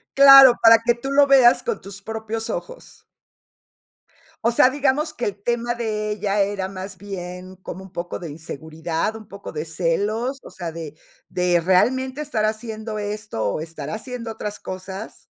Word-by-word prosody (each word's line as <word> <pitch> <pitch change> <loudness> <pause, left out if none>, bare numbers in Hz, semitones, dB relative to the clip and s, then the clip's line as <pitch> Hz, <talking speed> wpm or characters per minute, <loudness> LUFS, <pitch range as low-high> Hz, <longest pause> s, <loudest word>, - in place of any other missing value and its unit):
Claro, 275 -2 +9
para 230 0 +8
que 240 0 +3
tú 270 +3 -6
lo 285 0 +6
veas 265 -3 +6
con 465 -2 -3
tus 195 0 -11
propios 220 +1 -5
ojos. - - -8 1.4
¿O 235 - +3
sea, 255 +2 +5
digamos 290 +2 0
que 240 - -3
el 200 0 -4
tema 240 +1 -1
de 215 -2 -2
ella 205 -1 -1
era 195 -1 -2
más 190 0 -7
bien 185 -1 -8
como 190 0 -8
un 190 - -13
poco 175 -1 -5
de 170 - -6
inseguridad, 160 +5 -4
un 220 -1 -11
poco 200 0 -9
de 150 0 -4
celos, 200 - -1
o - - -10
sea, 175 -3 -6
de 160 -2 -8 0.3
de 180 -1 +1
realmente 260 - +2
estar 235 -8 -1
haciendo 220 0 -3
esto, 210 - -4
o - - -3
estar 160 -2 -7
haciendo 230 +3 -6
otras 210 -2 -6
cosas? 190 +3 -8
210 Hz, 170 wpm, -22 LUFS, 185-240 Hz, 1.4 s, Claro